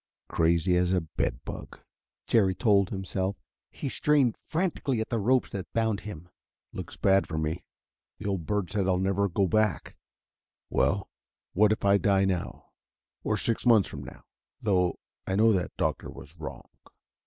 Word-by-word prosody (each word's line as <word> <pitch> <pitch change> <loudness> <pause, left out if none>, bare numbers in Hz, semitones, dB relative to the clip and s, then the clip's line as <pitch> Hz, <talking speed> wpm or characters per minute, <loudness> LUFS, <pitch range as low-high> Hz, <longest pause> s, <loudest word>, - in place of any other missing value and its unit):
"Crazy 85 +2 +2
as 90 +1 +2
a 90 - +2
bed 75 -5 -3
bug," - - -8 0.5
Jerry 95 -5 +3
told 100 -4 +3
himself. 95 0 -2 0.3
He - - -6
strained 140 -3 +2
frantically 155 -7 -1
at 110 - -3
the 115 - 0
ropes 125 +5 +2
that 95 -2 -6
bound 110 -3 +1
him. 90 -6 -9 0.5
"Looks - - -7
bad 95 0 +3
for 80 - -4
me: 80 +2 -2 0.5
the 105 - -9
old 95 -6 -2
bird 105 -4 -1
said 100 -3 0
I'd 90 -1 +2
never 100 +1 +1
go 95 +3 +1
back. 105 -2 0 0.8
Well, 100 0 +1 0.5
what 105 +2 +4
if 110 - -1
I 100 0 +5
die 100 -1 +3
now... 95 -2 -3 0.5
or - - 0
six 115 - 0
months 115 -5 +5
from 70 -2 -7
now? 60 - -11 0.4
Though 90 -5 +1 0.3
I 95 - 0
know 110 +2 +5
that 90 -2 -2
doctor - - -1
was 75 +4 -12
wrong." 80 - -7
100 Hz, 165 wpm, -28 LUFS, 90-110 Hz, 0.8 s, I